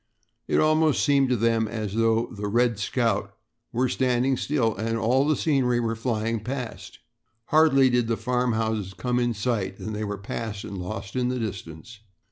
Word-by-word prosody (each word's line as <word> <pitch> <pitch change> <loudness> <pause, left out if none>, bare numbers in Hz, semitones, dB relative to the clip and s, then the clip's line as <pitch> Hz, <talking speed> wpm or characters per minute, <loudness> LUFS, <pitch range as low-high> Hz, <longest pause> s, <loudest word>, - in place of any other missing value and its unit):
It - - +2
almost 155 -1 +3
seemed 140 -2 +3
to 125 - +3
them 115 0 +1
as 105 -2 -4
though 115 +1 +2
the 105 0 -4
"Red 120 0 +1
Scout" 115 +3 -1 0.4
were 125 +2 +1
standing 130 +1 +1
still 125 -4 0
and 115 +1 -2
all 130 +5 +2
the 155 - +3
scenery 130 -6 +1
were 115 -1 -1
flying 115 -1 -1
past. 115 -6 -6 0.5
Hardly 155 -4 +5
did 120 -2 +2
the 115 -1 0
farmhouses 110 -4 -1
come 125 +4 -1
in 120 -1 0
sight 105 -3 -2
than 110 - -6
they 105 +1 -3
were 105 -1 -3
passed 100 +1 -5
and 100 - -7
lost 95 +2 -6
in 125 -1 +1
the 125 - -1
distance. 105 -1 -6
115 Hz, 175 wpm, -25 LUFS, 110-125 Hz, 0.5 s, Hardly